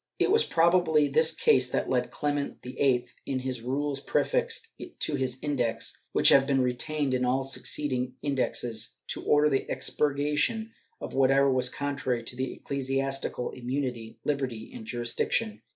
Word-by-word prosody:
^ - - -45
It - - +2
was 450 +2 +5
probably 165 -3 +3
this 160 +3 +4
case 130 -5 +3
that - - -1
led 125 -1 0
Clement 145 -1 -3
VIII, 125 0 +1 0.2
in 135 - -1
the 130 -2 -4
Rules 140 +2 -2
prefixed - - 0 0.3
to - - -2
his 130 -2 -1
Index, 130 -6 -1 0.2
which - - +5
have 135 0 +6
been 135 -2 +2
retained 130 +3 0
in 125 0 +1
all 130 +2 +1
succeeding 130 -1 -1
Indexes, 120 -5 -1
to - - -2
order 150 0 +4
the 135 -3 0
expurgation 150 - 0 0.3
of - - -7
whatever 135 +1 +4
was 130 -1 +2
contrary 135 -4 -2
to 130 +2 -3
ecclesiastical 135 -2 -2
immunity, 125 -3 -4
hberty 130 -6 -3
and 110 - -9
jurisdiction. 120 - -1
135 Hz, 150 wpm, -28 LUFS, 125-145 Hz, 0.3 s, have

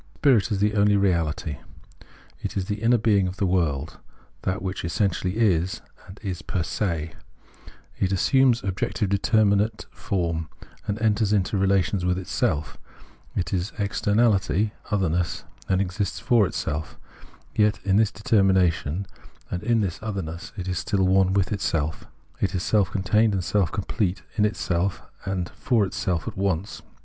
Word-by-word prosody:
Spirit 120 -8 +3
is 105 - +1
the 105 +1 +2
only 100 0 +4
Reality. 85 -6 0 0.8
It - - -4
is 95 - -1
the 105 +2 -4
inner 120 +2 +4
being 105 -4 +3
of 90 +2 -5
the 100 - +1
world, 80 -6 0 0.4
that 95 +2 -2
which 95 0 -3
essentially 90 +2 0
is, 95 -6 +1 0.3
and 95 - -12
is 95 -3 -4
per 90 - -2
se; 85 -4 -2 0.9
it 95 - +1
assumes 125 +4 +3
objective, 95 +2 -1
determinate 105 +1 +2
form, 85 -5 -2 0.4
and 105 +1 -2
enters 110 -1 +2
into 105 +1 +1
relations 95 -1 +2
with 90 0 +1
itself 80 -4 -1 0.3
— - - -29
it 90 0 -2
is 90 +1 0
externahty 105 -2 +2 0.2
(otherness), 90 -4 0 0.3
and 95 - +3
exists 100 +1 -2
for 115 -6 +3
self; 75 +1 -4 0.6
yet, 105 0 +2
in 95 0 +3
this 110 -1 +4
determination, 95 -5 +2 0.5
and 90 - -2
in 115 0 +2
its 90 -4 -3
otherness, 95 -6 -5
it 95 -1 -5
is 90 -2 -1
still 100 -4 +1
one 95 0 +4
with 95 -1 +1
itself 80 -7 -1 0.2
— - - -33
it - - 0
is 90 - -1
self 105 -4 +2
contained 105 +3 +2
and 95 - -1
self 90 0 +1
complete, 100 -2 -2
in 105 -1 +3
itself 95 -3 -1 0.2
and 90 -2 -2
for 115 -5 +1
itself 90 -3 -2
at - - -4
once. 95 0 -2
95 Hz, 155 wpm, -25 LUFS, 90-105 Hz, 0.9 s, only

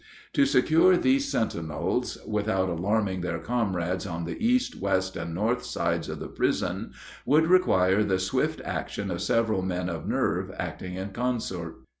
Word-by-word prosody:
To 280 - +4
secure 180 - +5
these 275 +5 +2
sentinels, 85 -8 -1
without 105 -3 0
alarming 95 +2 0
their 85 -1 -2
comrades 95 -2 -1
on 85 -2 -4
the 85 - -5
east, 250 +2 +1
west, 95 -1 0
and 85 - -4
north 115 +6 0
sides 85 -1 -1
of - - -4
the - - -5
prison, - - -1 0.3
would 150 +5 +4
require 105 - +4
the 95 -3 +1
swift 95 0 -1
action 100 -2 -3
of 85 0 -3
several 110 -1 +1
men 90 -1 -2
of 80 -3 -5
nerve - - 0
acting 90 0 -5
in 95 +2 -4
concert. 95 -8 -3
95 Hz, 155 wpm, -27 LUFS, 90-120 Hz, 0.3 s, secure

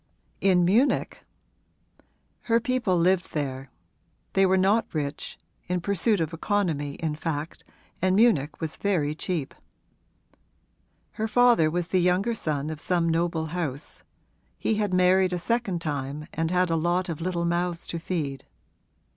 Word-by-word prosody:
'In 180 -3 +4
Munich?' 230 +10 +2 1.2
'Her 230 -1 +3
people 235 -6 0
lived 180 +2 +2
there; 135 -3 -3 0.6
they 195 0 +4
were 190 +1 +3
not 200 +4 +2
rich 145 -1 -3 0.3
in 180 +1 0
pursuit 200 +3 +1
of 160 0 -2
economy 165 -6 -1
in 160 -2 -2
fact, 155 0 -4 0.4
and 185 +1 +3
Munich 170 - +3
was 160 -2 -4
very 165 -8 0
cheap. 160 -3 -3 1.6
Her 220 0 -3
father 240 -8 +4
was 175 +1 -2
the 185 - +2
younger 180 +6 +2
son 155 -7 -2
of 155 - -6
some 175 -2 +1
noble 165 -1 0
house; 150 -5 -4 0.6
he - - 0
had 210 -2 0
married 185 0 +4
a - - 0
second 200 -2 -1
time 145 0 -3
and 160 0 -1
had 180 -1 +1
a - - +2
lot 175 +3 0
of 165 -2 -5
little 170 -1 -1
mouths 170 0 -1
to 170 - -4
feed. 155 -6 -4
175 Hz, 145 wpm, -26 LUFS, 155-190 Hz, 1.6 s, In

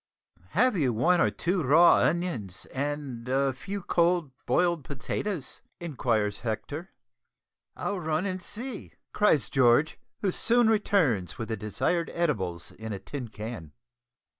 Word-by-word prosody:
"Have 255 -2 +4
you 135 -9 +1
one 175 +11 +3
or - - +4
two 180 +1 -1
raw 160 +5 +6
onions 145 - -1
and 135 -3 -3
a 135 +1 +2
few 195 +9 -6
cold 170 -4 +2 0.2
boiled 170 +3 +2
potatoes?" 145 - -4 0.2
inquires 115 -10 -1
Hector. 135 - -4 0.9
"I'll 200 -2 -2
run 160 +2 -1
and 185 -1 -3
see," 225 +5 -6 0.2
cries 160 - +3
George, 135 +4 +3 0.2
who 195 - +1
soon 235 +3 +3
returns 145 - +1
with 115 - -5
the 110 - -1
desired 110 - -1
edibles 95 - -1
in 110 0 -7
a - - -3
tin 130 +5 -6
can. 105 -7 -7
145 Hz, 135 wpm, -28 LUFS, 115-180 Hz, 0.9 s, raw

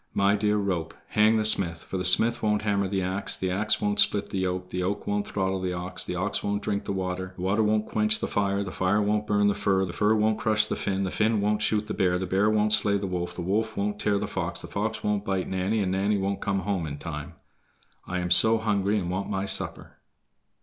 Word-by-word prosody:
"My 100 +1 +3
dear 105 0 +1
rope, 90 -5 -2
hang 110 +1 +4
the 110 - 0
smith, 85 -6 +3
for 95 - -5
the - - -2
smith 115 +6 +4
won't 105 -1 +1
hammer 100 -2 +1
the 95 0 -1
ax, 95 +2 -2
the 95 -1 -2
ax 105 +4 +1
won't 105 0 0
split 100 - +2
the 95 - -2
yoke, 90 0 -3
the 90 - -3
yoke 95 +3 -2
won't 100 0 -1
throttle 95 -1 -1
the 90 -1 -2
ox, 90 +1 -3
the - - -4
ox 95 +3 -1
won't 100 0 -2
drink 100 -1 -2
the - - -3
water, 95 -1 -3
the 90 - -7
water 100 +4 +1
won't 110 0 +1
quench 110 0 +1
the - - -2
fire, 100 0 0
the 95 - -6
fire 95 +3 +1
won't 105 0 0
burn 105 0 +2
the 100 - +3
fir, 95 -1 +1
the 85 - -7
fir 105 +1 +2
won't 110 0 +1
crush 110 -1 +2
the - - -3
Finn, 100 0 -2
the 95 - -2
Finn 110 0 +1
won't 105 +1 0
shoot 105 0 +1
the 110 - -4
bear, 90 -2 +1
the 95 - -3
bear 100 +3 +2
won't 105 0 +2
slay 100 -2 +3
the 100 - -4
wolf, 90 -1 -3
the 90 - -5
wolf 110 +4 -1
won't 105 +1 -2
tear 105 -1 +1
the - - -2
fox, - - -3
the - - -8
fox 110 +2 -3
won't 105 -1 0
bite 95 -2 -2
Nanny, 95 +4 -1
and 95 -2 -1
Nanny 100 +2 +1
won't 100 0 -2
come 100 -1 -1
home 95 -6 -2
in 70 -1 -6
time. 75 -1 -7 0.7
I 90 0 -2
am 90 0 -3
so 110 +5 +7
hungry 105 -2 0
and 90 -3 -2
want 95 +2 -3
my 95 0 -2
supper." 100 - -4
100 Hz, 255 wpm, -26 LUFS, 95-105 Hz, 0.7 s, so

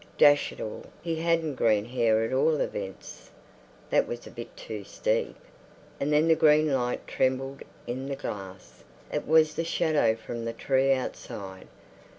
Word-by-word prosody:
Dash 145 0 +5
it - - -12
all, 110 - -6 0.2
he 165 -1 -2
hadn't 165 -2 +1
green 110 -5 +2
hair 115 -2 +2
at 115 - -2
all 150 +3 +3
events. 95 -2 -5 0.6
That - - +3
was 120 0 -6
a - - -10
bit 115 - -9
too 105 -2 -6
steep. - - -1 0.6
And 140 +2 0
then 150 +2 +4
the 165 - +6
green 155 -1 +4
light 125 -2 -1
trembled 135 +1 -1 0.2
in 130 +3 -4
the 140 - -2
glass; 95 -7 -8 0.3
it - - -2
was 155 0 +5
the 165 - -2
shadow 155 -8 +2
from 115 +1 -6
the 115 0 -3
tree 135 +1 +2
outside. 100 - -4
130 Hz, 160 wpm, -27 LUFS, 115-150 Hz, 0.6 s, the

